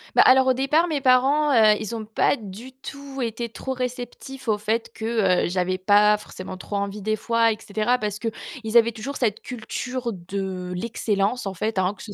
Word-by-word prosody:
Bah, - - +8
alors 260 0 +7
au 260 - +4
départ, 300 +7 +2
mes 300 -4 -1
parents, 270 +3 +4
heu, 220 -4 +6
ils 220 +1 -4
ont 220 -1 -5
pas 220 - +2
du 225 +2 -10
tout 275 +1 -9
été 230 +1 -3
trop 265 +3 -5
réceptifs 250 +1 -6
au 210 -2 +1
fait 225 +2 -1
que, 220 - -6 0.4
heu, - - -1
j'avais 185 0 -1
pas 210 +2 +5
forcément 185 -2 -8
trop 195 +2 -7
envie 200 +1 -3
des 215 +2 0
fois, 230 +1 +2
et 215 - -3
cetera, 215 +4 0
parce 210 -3 -3
qu'ils 230 0 -2
avaient 235 0 +5
toujours 240 +5 -6
cette 220 -4 0
culture 250 0 -4
de 185 0 -5
l'excellence, 210 +1 -1
en 190 - -4
fait, 215 +1 -1
hein, 185 +2 +1
que - - -11
ce 210 - -8
225 Hz, 205 wpm, -24 LUFS, 205-255 Hz, 0.4 s, Bah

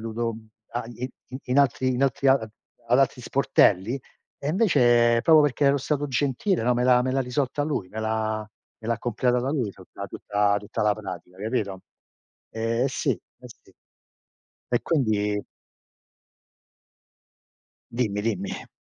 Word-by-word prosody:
dovuto 115 +1 -3 0.6
i 125 +1 -5 0.3
in 125 +3 +1
altri 130 -1 +3
in 125 +1 0
altri 135 0 +2
ad 125 -5 +3 0.4
altri 130 +1 +3
sportelli 120 -2 +2 0.4
e, 140 - -4
invece, 120 - +4
proprio 160 +3 +7
perché 145 0 +1
ero 140 +1 +4
stato 145 +2 -1
gentile, 140 - 0
no, 125 - +3
me 120 +1 +1
l'ha 125 -1 +5
me 130 - -1
l'ha 135 - +1
risolta 135 +2 -1
lui. 145 -11 -2
Me 110 +3 -6
l'ha 110 0 -1 0.4
me 110 - -8
l'ha 115 -1 0
completata 125 +2 0
lui 130 -8 -1
tutta 100 +1 -10
tutta 105 +1 0
tutta 105 +1 -6
la 105 -1 +3
pratica 90 - -8
capito? 105 -3 -2 0.7
Eh 115 +3 0
sì, 130 - -1
eh - - -2 0.3
sì. - - -18 1.0
E 120 - +1
quindi 105 -8 0 2.5
Dimmi, 105 -4 -1
dimmi. 100 -4 -3
120 Hz, 135 wpm, -25 LUFS, 110-135 Hz, 2.5 s, proprio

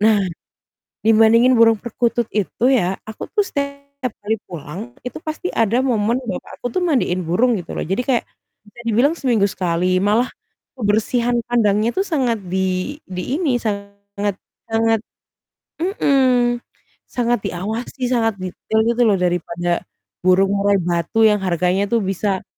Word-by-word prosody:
Nah, 215 +1 +5 0.9
dibandingin 225 +3 +6
burung 230 -1 +5
perkutut 240 +1 -1
itu 210 +2 -2
ya, 190 -6 +1
aku 220 0 -8
tuh 415 -2 +3
setiap 280 -3 -4
kali 215 +2 0
pulang, 170 +1 -7 0.2
itu 250 - -5
pasti 315 +3 -4
ada 225 +1 +2
momen 235 -1 +1
bapakku 205 +2 -7
tuh 370 - 0
mandiin 185 - +1
burung 205 +9 +2
gitu 170 - -10
loh. - - -2
Jadi 190 +8 0
kayak 245 -3 +2 0.4
bisa 210 +3 -17
dibilang 245 +8 +3
seminggu 245 -10 +1
sekali, 185 -1 0
malah 210 +5 +3 0.5
kebersihan 235 +2 +1 0.2
kandangnya 215 -2 +2
itu 385 - +3
sangat 260 - 0
di 190 - +1 0.5
di 180 -1 -4 0.2
ini, 285 -9 +2
sangat 200 -2 -4 0.3
sangat 225 0 +2 0.8
mhm, 260 - +2 0.5
sangat 240 -1 0
diawasi, 220 +9 -5
sangat 225 -3 +2
detail 185 +4 -2
gitu 235 +1 0
loh 205 - +4
daripada 175 0 -1 0.5
burung 185 +2 +4
murai 200 0 +2
batu 175 +6 +1
yang 210 -1 +5
harganya 185 +1 +1
tuh 230 +1 +1
bisa 195 0 -1
220 Hz, 140 wpm, -20 LUFS, 195-245 Hz, 0.9 s, dibandingin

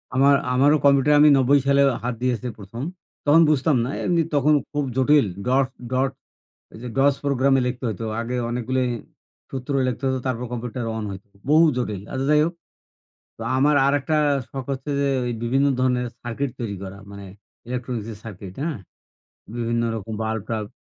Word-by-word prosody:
আমা 135 +2 +4 0.3
আমারও 140 +4 +4
কম্পিউটারে 140 +1 +5
আমি 150 +1 +7
৯০ 135 +2 +4
সালে 140 0 +4 0.2
হাত 125 +1 -1
দিয়েছি 125 -1 -1
১ম 105 +5 -7 0.4
তখন 150 +3 +6
বুঝতাম 150 0 +2
না, - - -4
এমনি 170 -2 +2
তখন 145 +2 +4 0.2
খুব 145 0 -1
জটিল। 140 +1 +4 0.2
ডটস 130 +1 +1 0.2
ডট 130 +1 +1 0.6
এই - - -11
যে - - -4
DOS 140 0 +4
প্রোগ্রামে 135 -1 +3
লিখতে 125 +1 -4
হইতো। 110 +1 -4 0.2
আগে 120 +2 -3
অনেকগুলি 125 +2 -1 0.7
সূত্র 135 +2 -4
লিখতে 125 +1 -3
হতো 130 0 0
তারপর 125 -1 -2
কম্পিউটার 120 0 -4
অন 110 - -3
হইতো, 95 +1 -10 0.2
বহু 160 +2 +6
জটিল। 105 -6 -2
আচ্ছা 130 +1 -2
যাই 150 0 +5
হোক। 170 - -3 0.8
তো - - -11 0.2
আমার 145 +3 +4
আরেকটা 145 +2 +1 0.3
শখ 135 -2 -6
হচ্ছে 135 +2 -7
যে 140 - +2 0.2
ওই 120 - -1
বিভিন্ন 135 +4 +2
ধরনের 125 -1 +1 0.2
সার্কিট 125 +4 -2
তৈরি 110 -4 -3
করা। 95 +1 -8
মানে 100 0 -9 0.4
ইলেকট্রনিস্ক 120 -3 -4
এর - - -11
সার্কিট, 100 -3 -8
হ্যাঁ? 155 -7 -3 0.8
বিভিন্ন 115 0 0
রকম 110 0 -6
বাল্ব-টাল্ব। 110 -1 -3
130 Hz, 165 wpm, -23 LUFS, 115-140 Hz, 0.8 s, আমি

